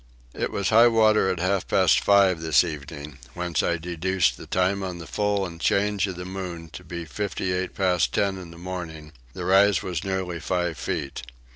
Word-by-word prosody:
It - - -2
was 100 -1 -1
high 115 +2 +7
water 110 -3 +4
at 90 -2 -2
half 95 +1 0
past - - +4
five 95 -4 +4
this 80 +1 +4
evening 75 -3 -7 0.2
whence 90 -1 -1
I 85 - 0
deduced 90 +2 0
the - - -12
time 95 +2 +1
on 90 -2 -4
the 85 - -9
full 105 +1 0
and 85 -2 -9
change 100 0 +1
of 95 - -5
the 90 0 -7
moon 90 -3 -6
to 70 - -10
be 85 -1 -6
58 95 -1 -3
past 90 -2 +1
10 100 -2 0
in 90 -2 -10
the 85 - -13
morning: 85 -4 -7 0.2
the 90 -2 -6
rise 95 0 +4
was 90 -2 -3
nearly 95 -3 -3
five 85 -1 -2
feet. 70 - -4
90 Hz, 190 wpm, -25 LUFS, 85-95 Hz, 0.2 s, high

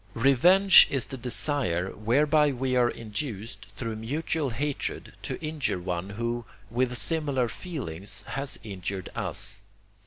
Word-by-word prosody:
Revenge 175 +11 +7
is 135 -2 0
the 135 - -7
desire 120 - 0
whereby 145 +7 +3
we 130 0 -1
are 120 -1 +4
induced, 115 0 -5
through 115 -3 -4
mutual 145 +5 -2
hatred, 140 +4 -3
to - - -5
injure 155 -9 -1
one 90 +1 -3
who, 115 +3 -3 0.3
with 125 +1 0
similar 140 +1 +1
feelings, 110 - -5
has 135 +3 -2
injured 95 -2 -5
us. 100 - -4
125 Hz, 125 wpm, -27 LUFS, 105-145 Hz, 0.3 s, Revenge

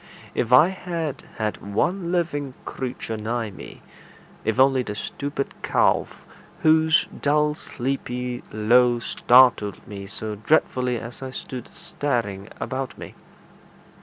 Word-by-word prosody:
If 120 - -1
I 150 +8 +8
had 170 -7 -4
had 110 -1 -1
one 170 - -1
living 145 -7 -1
creature 120 -3 -4
nigh 110 0 -2
me 95 - -11 0.6
if 110 +2 0
only 135 0 +5
the 105 -4 -5
stupid 140 +5 -4
calf, - - +1 0.4
whose 160 +1 +5 0.2
dull 150 +1 +3
sleepy 125 -3 -4
low 120 +3 +4
startled 120 -3 +4
me 100 -1 -7
so 110 +1 -5
dreadfully 125 +2 +1
as 115 +3 -8
I 130 - -5
stood 130 -1 -7
staring 110 -8 -3
about 130 +1 -4
me! - - -9
125 Hz, 120 wpm, -24 LUFS, 110-145 Hz, 0.6 s, I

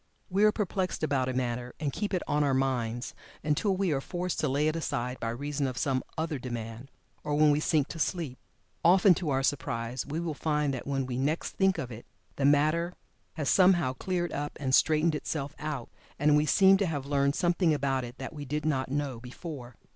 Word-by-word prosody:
We 195 +3 +3
are 215 - +6
perplexed 190 -5 -2
about 135 -4 +1
a - - -2
matter 125 -1 -2
and 145 -3 -2
keep 210 - -2
it 185 -3 0
"on 150 0 +2
our 140 -2 +2
minds" 125 -3 -1 0.3
until 165 +6 +1
we 190 -3 +1
are 135 -2 0
forced 180 +4 -3
to 155 - +1
lay 145 +3 +1
it 155 - 0
aside 125 -6 -2
by 115 - -2
reason 140 +4 -2
of 130 -1 -5
some 130 -2 +1 0.2
other 160 -3 -2
demand, 120 0 -6 0.3
or 150 -1 -1
when 150 0 +5
we 145 - +2
sink 155 -2 +2
to 165 - -7
sleep. 155 -6 -2 0.4
Often 185 +2 +6
to 170 -2 -3
our 135 -1 +1
surprise 125 -3 -1
we 150 +3 -4
will 170 -2 -2
find 150 -1 0
that 130 - -5
when 135 -1 0
we 125 -1 -3
next 150 +5 -1
think 190 -1 +2
of 125 - -4
it 115 +1 -10 0.3
the 140 - +1
matter 155 +5 +3 0.4
has 150 -3 -3
somehow 175 -7 +4
cleared 175 +3 -2
up 145 +1 -4
and 130 -3 -1
straightened 155 +3 +4
itself 145 -1 -3
out, 150 -5 -4 0.3
and 150 +1 +4
we 150 +1 +3
seem 195 +3 +6
to 200 -1 0
have 145 -5 -3
learned 140 0 +1
something 175 -1 +2
about 135 -3 0
it 120 +1 -8
that 135 +3 -6
we 145 -2 -6
did 150 +2 -3
not 135 -4 0
know 140 -3 -2
before. 125 0 -8
145 Hz, 215 wpm, -29 LUFS, 130-165 Hz, 0.4 s, are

